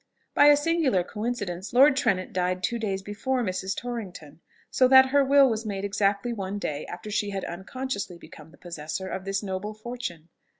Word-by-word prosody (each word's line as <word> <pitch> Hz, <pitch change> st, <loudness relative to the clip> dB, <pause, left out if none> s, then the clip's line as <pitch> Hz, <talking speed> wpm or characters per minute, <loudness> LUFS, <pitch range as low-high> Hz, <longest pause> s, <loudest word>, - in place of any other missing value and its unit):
By 290 Hz, -, +6 dB
a 290 Hz, 0 st, +7 dB
singular 290 Hz, -, +1 dB
coincidence, 210 Hz, -3 st, -4 dB
Lord 275 Hz, +3 st, +6 dB
Trenet 205 Hz, -8 st, 0 dB
died 180 Hz, 0 st, -1 dB
two 235 Hz, +5 st, -1 dB
days 195 Hz, -3 st, -2 dB
before 245 Hz, +6 st, -2 dB
Mrs. 190 Hz, -1 st, -2 dB
Torrington; 185 Hz, -11 st, -7 dB, 0.3 s
so 255 Hz, -, +4 dB
that 265 Hz, 0 st, +7 dB
her 285 Hz, +1 st, +4 dB
will 275 Hz, 0 st, +6 dB
was 225 Hz, -2 st, -1 dB
made 200 Hz, -2 st, -4 dB
exactly 200 Hz, +3 st, 0 dB
one 195 Hz, -2 st, -4 dB
day 150 Hz, -7 st, -4 dB
after 180 Hz, +4 st, -8 dB
she 205 Hz, 0 st, 0 dB
had 195 Hz, -1 st, -4 dB
unconsciously 200 Hz, +1 st, -5 dB
become 160 Hz, -2 st, -14 dB
the -, -, -19 dB
possessor 170 Hz, +2 st, -6 dB
of 190 Hz, 0 st, -5 dB
this 195 Hz, +1 st, -2 dB
noble 200 Hz, +2 st, -4 dB
fortune. 215 Hz, -8 st, -7 dB
205 Hz, 180 wpm, -26 LUFS, 185-245 Hz, 0.3 s, a